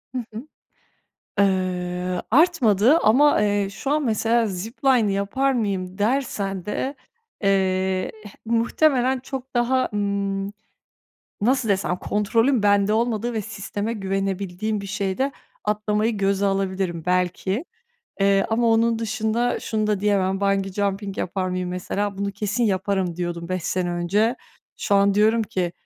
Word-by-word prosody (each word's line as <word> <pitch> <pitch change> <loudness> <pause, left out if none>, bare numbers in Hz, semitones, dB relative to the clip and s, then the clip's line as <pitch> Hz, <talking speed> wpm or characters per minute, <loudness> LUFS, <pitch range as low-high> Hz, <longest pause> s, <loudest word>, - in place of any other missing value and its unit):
Hı 250 - -1
hı. 230 +7 -7 0.9
Eee, 180 -2 0
artmadı. 260 - +4
Ama, 270 0 +4
eee, 205 -1 +1
şu 240 +8 -4
an 300 -1 +1
mesela 230 +1 +2
zipline 220 +4 +1
yapar 200 +8 0
mıyım 190 -6 -2
dersen 205 -5 -1
de, 265 +6 -3 0.5
eee, 190 -1 +1
eh, 205 - -9
muhtemelen 255 +3 +2
çok 265 0 -7
daha, 255 +1 +1
ımm, 200 -1 -1 0.9
nasıl 250 +1 +2
desem, 190 -2 +1
kontrolün 225 +5 +1
bende 205 0 +3
olmadığı 230 +1 0
ve 220 - -1
sisteme 205 +1 -4
güvenebildiğim 195 0 -2
bir 200 - -7
şeyde 200 +7 -1 0.3
atlamayı 210 +1 0
göze 200 0 +1
alabilirim 190 -3 -1
belki. 180 - 0 0.6
Eee, 195 0 +3
ama 235 +1 +1
onun 225 0 +3
dışında 225 +2 -1
şunu 215 -1 -1
da 210 -2 0
diyemem, 195 -2 +1
bungee 195 -1 +1
jumping 200 0 -2
yapar 185 +1 -2
mıyım 180 0 -2
mesela, 195 +2 -3
bunu 200 0 -2
kesin 210 +4 -1
yaparım 190 -3 0
diyordum 175 -1 -4
5 185 -1 -2
sene 180 +1 -1
önce. 200 +8 +1 0.4
Şu 200 - 0
an 200 0 +4
diyorum 220 +2 +3
ki, 185 -5 -2
205 Hz, 130 wpm, -23 LUFS, 190-230 Hz, 0.9 s, artmadı